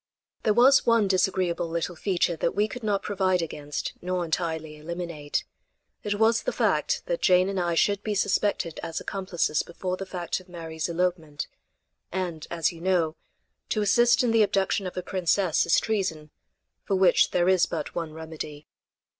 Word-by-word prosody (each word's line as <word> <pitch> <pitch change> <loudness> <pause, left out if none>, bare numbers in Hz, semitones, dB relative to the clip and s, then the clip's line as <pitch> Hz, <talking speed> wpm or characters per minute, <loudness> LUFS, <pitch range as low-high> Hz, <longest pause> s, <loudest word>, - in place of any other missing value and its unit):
There 215 - +2
was 265 +3 +6
one 230 -3 +4
disagreeable 185 -2 +1
little 170 +1 -2
feature 175 -1 0
that 170 - -1
we 205 +1 +2
could 245 +3 -8
not 205 -3 0
provide 185 -3 +1
against 150 -2 -5
nor 180 0 -1
entirely 160 -2 -3
eliminate. 165 -2 -4 0.6
It 205 -1 -1
was 225 +2 +3
the - - -1
fact - - +1
that - - -2
Jane 185 0 +4
and 195 -1 -2
I 170 -1 0
should 200 +4 +2
be 210 -1 -2
suspected 195 -4 0
as 165 - -4
accomplices 185 -6 -1
before 180 +2 -4
the 195 - -6
fact 180 -2 -3
of 185 0 -18
Mary's 165 -2 -5
elopement; 165 -4 -1 0.7
and, 175 -4 -3
as 165 -2 0
you 165 -1 -12
know, 170 -3 +1 0.5
to 215 - +1
assist 240 +5 +4
in 240 - +2
the 225 -1 +4
abduction 195 -1 +1
of 180 - -8
a 180 - -2
princess 185 -2 +1
is 165 - +5
treason 175 -8 -2 0.5
for 195 - 0
which 190 -1 +4
there 175 0 +1
is 185 -2 +4
but - - -4
one 165 -2 -3
remedy. 155 -2 -8
180 Hz, 170 wpm, -26 LUFS, 165-200 Hz, 0.7 s, was